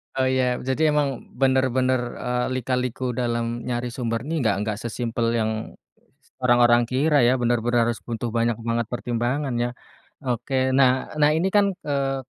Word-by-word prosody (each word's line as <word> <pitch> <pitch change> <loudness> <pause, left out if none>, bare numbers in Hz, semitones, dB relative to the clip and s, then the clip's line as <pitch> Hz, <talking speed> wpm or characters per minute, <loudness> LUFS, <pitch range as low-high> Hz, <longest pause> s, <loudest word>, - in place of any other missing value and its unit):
Oh, 130 - +1
ya, 130 -1 +1
jadi 140 +5 +1
emang 140 -4 -1
benar 130 0 +3
benar, 130 0 +1 0.2
eee, 125 0 -1
lika-liku 125 0 -2
dalam 120 -1 -2
nyari 120 -1 -2
sumber 115 -2 -3
nih, 160 +3 -2
nggak 110 -7 +2
nggak 105 -1 -2
sesimpel 115 0 -2
yang 110 -1 -2 0.7
orang-orang 120 -1 +4
kira 140 +2 +2
ya, 125 +2 +4
benar 120 0 +2
benar 120 -1 +2
harus 120 - -3
butuh 120 0 -3
banyak 115 0 +1
banget 115 0 -1
pertimbangan 120 +3 -2
ya. 120 0 0 0.5
Oke, 130 +2 0
nah 130 -1 +3
nah, 150 0 +5
ini 175 +4 +1
kan, 205 -1 +4
eee, 135 -2 -1
125 Hz, 160 wpm, -23 LUFS, 120-130 Hz, 0.7 s, nah